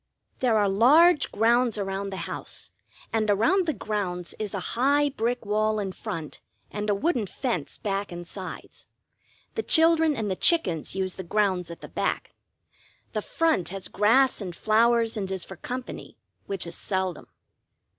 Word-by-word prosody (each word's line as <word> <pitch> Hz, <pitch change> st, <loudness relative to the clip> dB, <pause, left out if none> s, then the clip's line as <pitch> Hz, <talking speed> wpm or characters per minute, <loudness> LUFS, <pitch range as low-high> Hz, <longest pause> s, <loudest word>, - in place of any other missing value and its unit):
There 240 Hz, -4 st, +3 dB
are 205 Hz, -1 st, +3 dB
large 295 Hz, -, +5 dB
grounds 235 Hz, +1 st, +2 dB
around 195 Hz, 0 st, -3 dB
the 190 Hz, -, -6 dB
house, -, -, -6 dB, 0.4 s
and 215 Hz, -1 st, +1 dB
around 245 Hz, -, +3 dB
the -, -, +3 dB
grounds 185 Hz, -7 st, -3 dB
is 210 Hz, -2 st, -3 dB
a -, -, -1 dB
high 285 Hz, +4 st, +3 dB
brick 240 Hz, -2 st, -2 dB
wall 215 Hz, +1 st, +1 dB
in 200 Hz, -2 st, -2 dB
front 160 Hz, -4 st, -6 dB, 0.3 s
and 210 Hz, 0 st, -3 dB
a 205 Hz, -, +3 dB
wooden 240 Hz, -, 0 dB
fence 205 Hz, -, -3 dB
back 200 Hz, -1 st, -3 dB
and 175 Hz, 0 st, -7 dB
sides. 190 Hz, -1 st, -8 dB, 0.7 s
The 445 Hz, -, -1 dB
children 325 Hz, -5 st, +4 dB
and 215 Hz, -5 st, -2 dB
the -, -, 0 dB
chickens 180 Hz, -, +2 dB
use 190 Hz, -1 st, -1 dB
the 190 Hz, -, -7 dB
grounds 185 Hz, -2 st, 0 dB
at 170 Hz, -, -9 dB
the -, -, -8 dB
back; -, -, -2 dB, 0.8 s
the -, -, -1 dB
front 325 Hz, -, 0 dB
has 195 Hz, 0 st, -5 dB
grass 230 Hz, +6 st, +3 dB
and 180 Hz, -3 st, -5 dB
flowers, 230 Hz, +2 st, +3 dB
and 195 Hz, -2 st, -3 dB
is 190 Hz, -2 st, -3 dB
for 190 Hz, -, -9 dB
company, 250 Hz, +8 st, -7 dB, 0.3 s
which 195 Hz, -3 st, -2 dB
is 170 Hz, -, -6 dB
seldom. 185 Hz, -3 st, -3 dB
210 Hz, 165 wpm, -26 LUFS, 190-245 Hz, 0.8 s, large